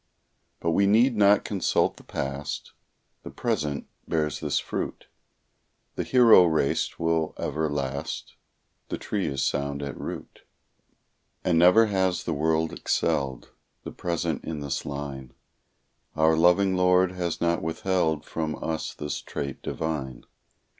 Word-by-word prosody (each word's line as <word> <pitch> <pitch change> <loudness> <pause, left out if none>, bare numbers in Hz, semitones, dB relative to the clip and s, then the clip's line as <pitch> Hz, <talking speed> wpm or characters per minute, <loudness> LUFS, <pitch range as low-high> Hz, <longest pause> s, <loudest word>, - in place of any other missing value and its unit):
But 85 - 0
we 100 +4 +3
need 115 +5 +4
not 100 -1 +4
consult 100 -3 +1
the - - -14
past; 70 +2 -5 0.5
The - - -8
present 75 -1 -2 0.2
bears 75 -4 -1
this - - -1
fruit: - - -4 0.9
The - - -3
hero 120 -7 +7
race 80 -4 0
will 80 -1 0
ever 80 +1 -1
last; 70 -1 -4 0.6
The - - -2
tree 100 -3 -2
is 70 -1 -1
sound 70 +1 -1
at 70 - -5
root. - - -7 1.0
And 85 -3 +3
never 90 +6 +7
has 95 -3 0
the - - -2
world 80 +2 +1
excelled 65 -2 -1 0.3
The - - -6
present 85 -3 -2
in 80 -2 -5
this 70 -1 -3
line; 70 -3 -6 0.8
Our 80 0 +4
loving 90 +3 +4
Lord 90 0 +4
has 90 -2 -3
not 85 0 +1
withheld 80 -1 0
From 80 -1 -3
us 80 -1 -4
this 75 - -4
trait 70 -2 -5
divine. 70 -6 -4
80 Hz, 135 wpm, -26 LUFS, 70-90 Hz, 1.0 s, hero